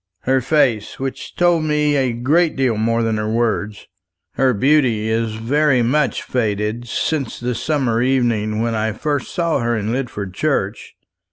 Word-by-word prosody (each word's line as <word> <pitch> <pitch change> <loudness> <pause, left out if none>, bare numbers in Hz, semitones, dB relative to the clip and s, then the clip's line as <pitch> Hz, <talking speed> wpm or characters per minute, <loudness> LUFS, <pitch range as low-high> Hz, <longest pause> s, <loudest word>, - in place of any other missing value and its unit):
"Her 130 0 +1
face, 125 -6 +1
which 135 0 -5
told 175 -2 +3
me 150 -1 +1
a 130 -3 +1
great 150 +8 +1
deal 130 -4 +1
more 115 +2 +1
than 110 -1 0
her 105 0 -2
words. 110 -2 -1 0.5
Her 130 -1 +2
beauty 125 -2 +2
is 110 -1 -1
very 130 +3 +2
much 140 +5 +1
faded 110 0 -2
since 140 +1 -2
the 125 +1 -2
summer 125 -3 0
evening 115 -4 +1
when 115 0 -1
I 110 0 -1
first 145 +3 -2
saw 170 -4 0
her 120 -1 0
in 105 +1 -2
Lidford 115 -7 -4
Church. 105 -5 -2
120 Hz, 160 wpm, -19 LUFS, 110-140 Hz, 0.5 s, told